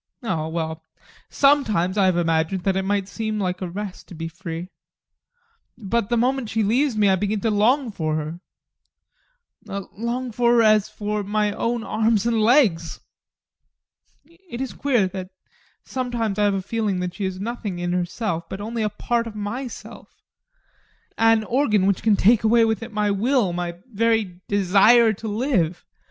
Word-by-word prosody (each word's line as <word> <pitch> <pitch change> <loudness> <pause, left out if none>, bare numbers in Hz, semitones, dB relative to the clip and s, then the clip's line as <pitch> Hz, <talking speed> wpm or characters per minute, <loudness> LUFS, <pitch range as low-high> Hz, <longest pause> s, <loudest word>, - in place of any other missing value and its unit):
Oh, 165 -9 -2
well, 160 -1 -4 0.5
sometimes 220 -11 +2
I 200 -2 +3
have 185 -2 +2
imagined 165 +2 0
that 195 0 +1
it 190 - +1
might 195 0 -1
seem 220 +1 -3
like 185 -2 -2
a 185 - -3
rest 195 +1 -7
to 175 - -11
be 165 +1 -5
free. 170 +1 -7 1.1
But 230 -1 -1
the 240 - +1
moment 250 0 0
she 220 0 0
leaves 245 +4 +1
me, 210 -1 +4
I 190 - +4
begin 205 +2 -1
to 225 - +1
long 235 +5 +2
for 155 -5 -2
her 155 +2 -4 1.6
long 240 +3 -3
for 235 +1 +2
her 235 - +5
as 215 -2 +4
for 210 0 -3
my 210 +1 0
own 230 +2 -2
arms 220 -1 +1
and 230 -2 +1
legs. 215 - +3 1.3
It 335 -7 -11
is 265 -1 -4
queer 245 -9 +1
that 185 0 -6 0.6
sometimes 235 -5 -2
I 205 - +3
have 200 -1 +2
a 190 - -3
feeling 210 -2 -1
that 180 -1 -3
she 200 - -4
is 190 0 -4
nothing 210 -3 -4
in 175 0 -2
herself, 175 -1 -2
but 190 - -6
only 225 +2 -4
a 215 - +1
part 230 +3 -1
of 220 - -8
myself 235 +5 -7 1.0
an 225 -1 +4
organ 215 -5 +1
that 195 -2 +1
can 220 -2 +3
take 220 +3 +4
away 225 +1 +4
with 220 +1 -1
it 230 +1 -7
my 210 -1 0
will, 220 -1 +1
my 175 -1 -4
very 220 -5 0
desire 205 +4 +5
to 220 +2 -7
live. 205 - -1
210 Hz, 170 wpm, -23 LUFS, 185-230 Hz, 1.6 s, her